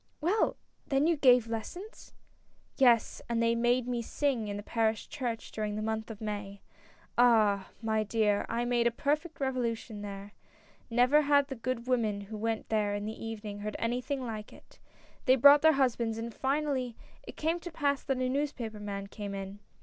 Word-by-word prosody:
" - - -43
Well! 370 +8 +1 0.3
then 275 0 +2
you 335 0 +3
gave 250 -5 +5
lessons! 350 - -7 0.3
" - - -39 0.3
"Yes, 240 -4 +4
and 235 -1 0
they 230 0 +3
made 240 +1 +2
me 245 -1 -1
sing 245 -2 -1
in 205 0 -4
the 205 - -6
parish 220 -1 0
church 240 -5 -4
during 210 -1 -3
the 215 - -3
month 220 0 -2
of 220 -2 -8
May. 205 -2 -5 0.6
Ah! 215 -5 +4
my 220 -1 +1
dear, 210 -1 +1
I 235 +1 -1
made 240 -1 +2
a - - +5
perfect 300 +7 -2
revolution 235 -5 -2
there. 200 0 -7 0.6
Never 250 +6 +4
had 285 -1 +3
the 270 - -4
good 240 0 -3
women 225 -5 0
who 210 +2 -7
went 225 0 -2
there 210 -2 +1
in 205 0 -4
the 220 +1 -6
evening 215 -2 -6
heard 210 +1 -4
anything 250 +3 -2
like 215 -2 -6
it. - - -18 0.5
They 260 -2 +6
brought 285 +3 +8
their 315 0 +6
husbands, 235 -5 +1
and 230 0 -5
finally 270 -3 -1 0.3
it - - -11
came 325 +3 0
to 350 0 -8
pass 285 -3 0
that 270 -2 -1
a 255 0 0
newspaper 255 -5 -2
man 200 -1 -5
came 200 0 -6
in. 195 +1 -6
230 Hz, 190 wpm, -30 LUFS, 215-270 Hz, 0.6 s, brought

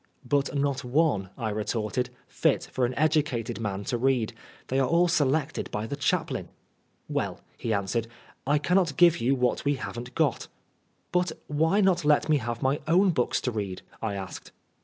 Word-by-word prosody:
" - - -30
But 140 0 0
not 140 0 0
one," 125 - +1
I 110 -3 -2
retorted, 110 +3 -1
" - - -39
fit - - +3
for 125 -2 +1
an 125 - -5
educated 145 -8 +1
man 100 -3 -3
to 120 +4 -2
read. 125 -3 +1 0.4
They 130 - +1
are 135 - +3
all 170 +3 +4
selected 155 -2 +1
by 105 +1 -3
the 125 - -4
chaplain." 145 - -1 0.6
"Well," - - -2 0.2
he 115 - -3
answered, 105 +2 0 0.4
"I 145 +2 +4
cannot 175 -1 +1
give 170 -1 +6
you 130 +4 +3
what 125 -1 0
we 145 0 +2
haven't 125 -1 -7
got." - - +1 0.3
" - - -43
But 180 -2 +1
why 160 +7 +2
not 185 -3 +3
let 150 +1 +3
me 155 - +5
have 120 -2 -4
my 135 +2 +2
own 185 +4 +5
books 125 -7 +1
to 125 - -1
read 100 -4 -4
?" - - -27
I 110 -3 -2
asked. 95 -1 -7
135 Hz, 190 wpm, -27 LUFS, 115-155 Hz, 0.6 s, give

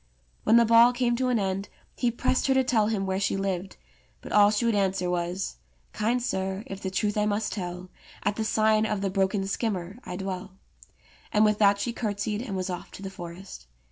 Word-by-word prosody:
When 225 - +6
the 235 - +6
ball 230 +2 +6
came 245 -1 +1
to 255 0 0
an 245 - +2
end 195 -1 -2 0.3
he 245 - +1
pressed 250 +3 0
her 265 - +3
to 265 - +4
tell 225 -5 +2
him 210 -3 -1
where 190 0 -1
she 195 - 0
lived, 190 -1 -3 0.4
but - - -9
all 205 -1 +6
she 215 +3 0
would 230 - +3
answer 190 -3 +1
was: 175 - -2 0.4
"Kind 230 +3 0
sir, 190 -2 -2
if 195 0 -7
the 190 - -2
truth 205 +2 -1
I 210 - +2
must 210 +1 -1
tell, 180 -1 -6 0.3
At 205 - +1
the 220 - -1
sign 220 0 +2
of 210 -2 -2
the 195 -1 -1
'Broken 195 0 +1
Skimmer' 195 -1 -3
I 180 - -6
dwell"; 190 0 -5 0.8
and 215 0 +4
with 210 -1 +2
that 200 -1 +5
she 235 +4 -2
curtsied, 210 -1 -2
and 230 -6 -5
was 185 0 -2
off 175 - -6
to 195 - -9
the 195 - -5
forest. 175 - -9
200 Hz, 215 wpm, -27 LUFS, 190-220 Hz, 0.8 s, When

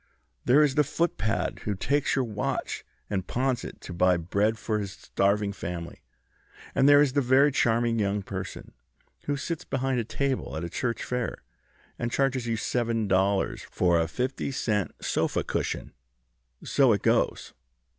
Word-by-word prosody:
There 140 +5 +6
is 145 -3 +2
the 150 - +4
footpad 135 -7 -1
who 105 - -1
takes 140 +8 +1
your 135 -2 +1
watch, 105 -3 -3 0.2
and 95 -3 -2
pawns 130 0 0
it - - -8
to 90 - -8
buy 90 +1 +3
bread 100 +6 0
for 110 -1 -1
his 100 -2 -4
starving 100 +1 0
family, 85 -3 -6 0.7
and 135 - +4
there 145 0 +8
is 135 -3 0
the 140 - +3
very 135 +3 +5
charming 115 -2 +2
young 100 -1 0
person - - -7 0.5
who 145 0 -1
sits 165 +3 -4
behind 135 -1 -1
a - - 0
table 135 - -2
at 80 - -4
a 85 - -4
church 120 -2 -2
fair, 125 -2 -3 0.6
and 120 -1 -2
charges 135 -3 0
you 115 -1 0
seven 115 -1 0
dollars 95 +1 +1
for 85 -2 +2
a 80 - +1
fifty 125 +13 -2
cent 105 -7 0 0.2
sofa - - 0
cushion. - - -3 0.7
So 135 -5 +4
it 100 - -1
goes. - - +1
115 Hz, 165 wpm, -27 LUFS, 100-135 Hz, 0.7 s, there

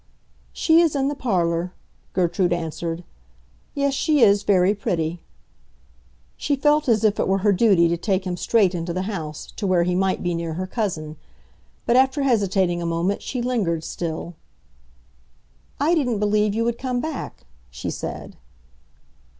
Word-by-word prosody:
"She 325 +1 +4
is 325 -4 +2
in 275 0 +1
the - - -2
parlor," 175 -7 -1 0.4
Gertrude 180 0 +1
answered. 165 0 -4 0.7
"Yes, 280 -1 +1
she 295 +1 +2
is 205 -3 +5
very 190 -1 +3
pretty." 170 -4 -2 1.2
She 285 - 0
felt 295 +1 +2
as 220 -2 +3
if 215 -1 +2
it - - +1
were 195 - +2
her 205 - +5
duty 195 -4 +4
to 170 +1 0
take 190 +1 -1
him 180 -1 -2
straight 195 0 +2
into 170 0 -3
the 185 +1 -2
house, 165 -7 -6
to 205 - -2
where 180 -2 +3
he 180 +1 0
might 190 +1 0
be 175 -1 0
near 165 -1 -3
her 185 +2 -3
cousin. 170 -8 -3 0.7
But 235 - +3
after 265 +2 +3
hesitating 195 -8 +1
a - - -3
moment 170 +4 -1
she 250 -2 -4
lingered 195 -10 -1
still. 170 +1 -5 1.5
"I 300 +5 +2
didn't 255 -9 +1
believe 210 0 +1
you 230 - +1
would 235 0 -1
come 255 -2 -2
back," 315 +4 -6 0.2
she - - -5
said. - - -6
195 Hz, 160 wpm, -23 LUFS, 175-240 Hz, 1.5 s, is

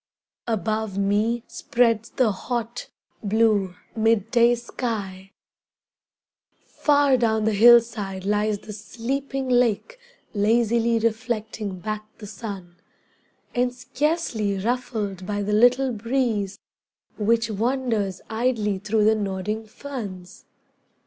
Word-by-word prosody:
Above 215 -1 -1
me 210 +4 +1
spreads 230 -2 +1
the 245 -5 +2
hot, 235 +4 -4 0.3
blue 210 -3 +2 0.2
mid 225 -1 +2
day 240 0 +5
sky, 205 -6 -5 1.3
Far 285 -3 +3
down 220 -2 +1
the 220 - +2
hillside 215 -4 +4
lies 210 +1 +1
the 210 +1 -10
sleeping 265 +6 -4
lake 250 - +1 0.3
Lazily 230 +2 +2
reflecting 220 -3 -2
back 215 +3 -4
the 215 - -9
sun, 195 -5 -8 0.8
And 245 0 +1
scarcely 250 - -1
ruffled 210 -4 -2
by 205 -1 -1
the 210 +1 -1
little 250 +4 +4
breeze 225 -3 -1 0.6
Which 230 +2 +2
wanders 225 -4 -1
idly 220 -4 0
through 210 +2 +1
the 220 - +5
nodding 210 +1 -3
ferns. 210 -8 -8
220 Hz, 105 wpm, -24 LUFS, 205-240 Hz, 1.3 s, day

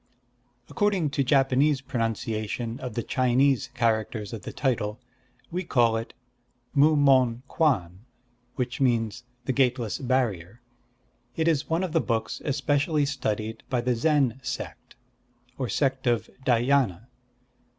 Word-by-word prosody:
"According 195 -8 0
to 140 - +1
Japanese 135 +1 +3
pronunciation 115 -2 -3
of 125 -4 -6
the 120 - -1
Chinese 130 +1 +2
characters 110 -3 0
of 110 - -6
the - - -7
title, 110 -6 -1 0.5
we 180 +2 -2
call 120 -8 +3
it 115 0 -5 0.6
Mu 150 +2 +5
Mon 130 -4 +3
Kwan, 95 - 0 0.6
which 125 +1 -3
means 120 -2 +1 0.2
'The 130 - 0
Gateless 125 -4 +1
Barrier.' 120 -7 -1 0.8
It 160 0 0
is 155 -3 +1
one 165 +3 +1
of 185 - -2
the 165 0 +2
books 115 -2 -2
especially 145 +1 +1
studied 110 -5 -3
by 125 -2 0
the 125 +1 +1
Zen 135 -1 +2
sect, - - -6 0.6
or 130 -3 -2
sect 135 -2 0
of 120 -2 0 0.2
Dhyâna. 120 -5 +2
125 Hz, 130 wpm, -26 LUFS, 115-140 Hz, 0.8 s, Mu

